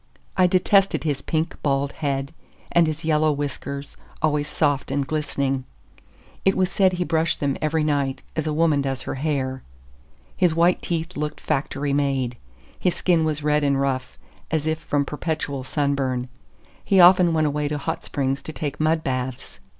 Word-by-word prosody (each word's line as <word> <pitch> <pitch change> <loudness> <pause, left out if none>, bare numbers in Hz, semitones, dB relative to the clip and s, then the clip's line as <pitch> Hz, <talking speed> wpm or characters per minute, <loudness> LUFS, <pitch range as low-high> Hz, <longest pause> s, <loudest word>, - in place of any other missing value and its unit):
I 185 -1 +5
detested 195 +1 +3
his 145 -4 -1
pink, 160 +1 -2
bald 140 -1 +1
head, 140 -1 -2 0.4
and 170 -1 +4
his 155 +1 -4
yellow 155 -1 +3
whiskers, 140 -1 -4 0.2
always 150 -1 +1
soft 145 -3 0
and 140 -1 0
glistening. 140 -3 -1 0.8
It 195 - +3
was 185 -1 +2
said 190 -1 +3
he 180 0 0
brushed 160 -1 0
them 140 -2 0
every 155 0 +1
night, 140 -3 0
as 155 -1 -1
a - - 0
woman 155 -2 +2
does 135 -1 -3
her - - -4
hair. 130 -2 -2 0.7
His 175 -3 +2
white 170 +2 +3
teeth 170 +1 -3
looked 150 +1 -3
factory 140 +1 -1
made. 135 -4 0 0.4
His 180 - +1
skin 170 -3 +2
was 155 -1 -2
red 150 0 +2
and 140 -1 +2
rough, 130 -2 -2 0.3
as 155 -2 0
if 160 0 0
from 145 -2 0
perpetual 150 -2 -3
sunburn; 135 -3 -1 0.5
he 195 - +3
often 180 -1 +7
went 160 -1 +2
away 150 0 0
to 150 0 -2
hot 160 +3 -3
springs 135 0 -1
to - - -7
take 145 -2 -4
mud 155 +1 +2
baths. 130 -1 -4
150 Hz, 170 wpm, -23 LUFS, 140-160 Hz, 0.8 s, often